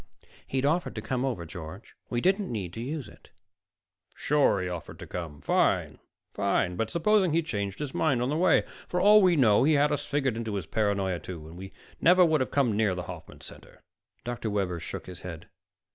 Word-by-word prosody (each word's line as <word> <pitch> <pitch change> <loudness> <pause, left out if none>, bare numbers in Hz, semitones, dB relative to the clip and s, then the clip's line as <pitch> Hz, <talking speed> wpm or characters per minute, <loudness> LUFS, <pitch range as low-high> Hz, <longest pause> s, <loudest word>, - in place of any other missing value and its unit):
"He'd 135 0 -1
offered 165 +5 0
to - - -4
come 130 -2 -2
over, 120 -11 -2
George. 85 +3 -9 0.2
We 120 -1 -1
didn't 195 - +1
need 95 -7 -4
to 115 - -6
use 140 +2 -4
it." - - -17 0.9
"Sure, 140 -9 +2
he 90 - -2
offered 85 -3 -6
to - - -9
come 80 -5 -7
fine, - - +1 0.3
fine. 95 -2 0
But 110 +4 -2
supposing 185 - +2
he 165 +1 +2
changed 100 -9 -3
his 145 -3 -5
mind 140 -6 +1
on 125 +2 0
the 150 - 0
way? 175 +1 +4 0.2
For 180 - -1
all 210 +2 +7
we 180 -3 +4
know, 115 -8 +4
he 155 +3 +4
had 145 0 +3
us 145 - -1
figured 135 -5 0
into 110 -3 -3
his 95 -5 -3
paranoia, 100 -2 0
too, 85 -4 -8
and 90 +4 -9 0.3
never 180 +1 +6
would 155 -4 +2
have 130 - -1
come 130 -7 +1
near 105 -3 +1
the 90 - -4
Hoffman 85 -3 -10
Center." - - -13 0.4
Dr. 120 -2 -4
Webber 95 -4 -1
shook - - -7
his 90 -2 -9
head. 85 -3 -8
115 Hz, 205 wpm, -28 LUFS, 95-150 Hz, 0.9 s, all